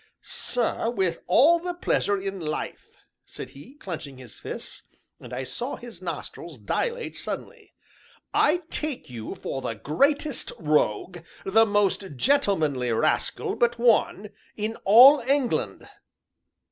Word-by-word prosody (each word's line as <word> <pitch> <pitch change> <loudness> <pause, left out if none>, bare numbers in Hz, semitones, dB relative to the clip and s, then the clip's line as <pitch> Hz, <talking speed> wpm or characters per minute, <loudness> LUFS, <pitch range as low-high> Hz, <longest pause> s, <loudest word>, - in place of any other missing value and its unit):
"Sir, 240 -2 -1
with 190 -8 -1
all 315 - +5
the 355 +1 -4
pleasure 205 - 0
in 195 0 -5
life!" 155 -2 -5 0.3
said 130 - -9
he, 145 - -14
clenching 155 - -7
his 125 -4 -12
fists, - - -7 0.4
and - - -12
I 130 - -3
saw 240 - -4
his 235 -7 -11
nostrils 170 -2 -7
dilate 470 - -3
suddenly. - - -7 0.6
"I 350 +4 +3
take 300 - -4
you 115 -3 -6
for 135 - -5
the 115 - -3
greatest 280 - 0
rogue, 155 - 0 0.3
the 225 +3 +4
most 200 -5 0
gentlemanly 155 - +1
rascal 110 - 0
but 240 0 +1
one, 220 -3 +2 0.3
in 215 +1 -2
all 255 +8 +9
England!" 265 0 -1
205 Hz, 125 wpm, -25 LUFS, -, 0.6 s, all